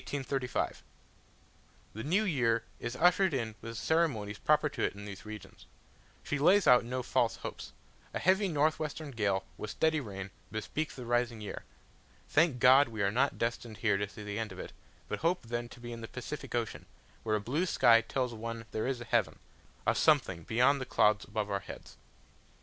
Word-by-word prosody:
The 135 Hz, -2 st, -2 dB, 1.2 s
new 185 Hz, +8 st, +2 dB
year 120 Hz, -, +1 dB, 0.2 s
is 120 Hz, +1 st, -4 dB
ushered 175 Hz, +2 st, +4 dB
in 115 Hz, -4 st, -2 dB
with 115 Hz, -, -6 dB
the -, -, -5 dB
ceremonies 120 Hz, -12 st, +1 dB
proper 150 Hz, 0 st, +3 dB
to 145 Hz, -, -5 dB
it -, -, 0 dB
in 100 Hz, 0 st, -9 dB
these 100 Hz, -2 st, -9 dB
regions. 110 Hz, 0 st, -10 dB, 0.6 s
She 145 Hz, -, -2 dB
lays 190 Hz, +7 st, +5 dB
out 125 Hz, -1 st, +7 dB
no 125 Hz, +2 st, -3 dB
false -, -, +1 dB
hopes: -, -, -7 dB, 0.4 s
a -, -, -3 dB
heavy 190 Hz, +2 st, +3 dB
north 155 Hz, -2 st, +2 dB
western 155 Hz, -1 st, -4 dB
gale, 100 Hz, -5 st, 0 dB
with 105 Hz, -, -5 dB
steady 160 Hz, +6 st, +1 dB
rain, 100 Hz, -6 st, -6 dB, 0.2 s
bespeaks 140 Hz, +7 st, -3 dB
the 125 Hz, -, -7 dB
rising 120 Hz, -1 st, 0 dB
year. 105 Hz, -, -7 dB, 0.6 s
Thank 155 Hz, -3 st, +3 dB
God, 130 Hz, +4 st, +7 dB
we 110 Hz, -3 st, -3 dB
are 100 Hz, -, +2 dB
not 130 Hz, +6 st, +1 dB
destined 115 Hz, -1 st, -3 dB
here 100 Hz, 0 st, +2 dB
to 100 Hz, 0 st, -2 dB
see 105 Hz, -, -10 dB
the 105 Hz, +1 st, -4 dB
end 110 Hz, -1 st, -3 dB
of -, -, -9 dB
it, -, -, -7 dB, 0.3 s
but -, -, -3 dB
hope 170 Hz, +3 st, +1 dB
then 120 Hz, +1 st, -3 dB
to 120 Hz, -, -13 dB
be 120 Hz, 0 st, -7 dB
in 115 Hz, -, -8 dB
the 115 Hz, -, -6 dB
Pacific 135 Hz, +1 st, -6 dB
Ocean, 115 Hz, -2 st, -3 dB, 0.3 s
where 110 Hz, -1 st, 0 dB
a -, -, +1 dB
blue 145 Hz, -, -1 dB
sky 115 Hz, -8 st, +6 dB
tells 125 Hz, 0 st, -2 dB
one 115 Hz, 0 st, -6 dB
there 110 Hz, -, -2 dB
is 130 Hz, -2 st, -2 dB
a -, -, -6 dB
heaven, 105 Hz, -11 st, +1 dB, 0.5 s
a -, -, +4 dB
something 85 Hz, -, +3 dB
beyond 125 Hz, -, +3 dB
the -, -, -3 dB
clouds 105 Hz, -1 st, +3 dB
above 105 Hz, -1 st, -3 dB
our 100 Hz, -, 0 dB
heads. -, -, -11 dB
120 Hz, 195 wpm, -31 LUFS, 110-145 Hz, 1.2 s, out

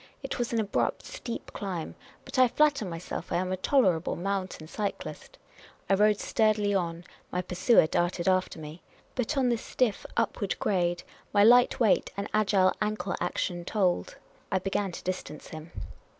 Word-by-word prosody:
It -, -, -4 dB
was 240 Hz, -, -1 dB
an 230 Hz, -, +1 dB
abrupt, 210 Hz, -2 st, -1 dB
steep 255 Hz, -, -7 dB
climb; 185 Hz, -6 st, -4 dB, 0.3 s
but 260 Hz, -, -3 dB
I 255 Hz, -, +7 dB
flatter 285 Hz, -2 st, +2 dB
myself 170 Hz, -1 st, -6 dB
I -, -, +1 dB
am 185 Hz, +1 st, 0 dB
a -, -, +1 dB
tolerable 185 Hz, -, +2 dB
mountain 190 Hz, -3 st, -3 dB
cyclist. 200 Hz, +4 st, -5 dB, 0.5 s
I -, -, +3 dB
rode 210 Hz, +1 st, +4 dB
sturdily 215 Hz, -2 st, +2 dB
on; 170 Hz, -3 st, -1 dB, 0.3 s
my 180 Hz, -, -1 dB
pursuer 185 Hz, +3 st, +4 dB
darted 175 Hz, +2 st, 0 dB
after 185 Hz, -2 st, +2 dB
me. 155 Hz, +2 st, -9 dB, 0.3 s
But 260 Hz, +4 st, -1 dB
on 260 Hz, -2 st, +3 dB
this 235 Hz, -2 st, 0 dB
stiff 245 Hz, -5 st, 0 dB
upward 205 Hz, -3 st, 0 dB
grade 175 Hz, -3 st, 0 dB, 0.3 s
my 205 Hz, -1 st, +6 dB
light 245 Hz, +3 st, +6 dB
weight 225 Hz, -5 st, +3 dB
and 200 Hz, +1 st, -2 dB
agile 200 Hz, -3 st, +3 dB
ankle 210 Hz, -3 st, -1 dB
action 175 Hz, 0 st, -2 dB
told; 185 Hz, -1 st, 0 dB, 0.3 s
I 190 Hz, -, +3 dB
began 195 Hz, +1 st, -1 dB
to -, -, -8 dB
distance 180 Hz, -5 st, -5 dB
him. 155 Hz, +1 st, -9 dB
195 Hz, 165 wpm, -28 LUFS, 175-220 Hz, 0.5 s, I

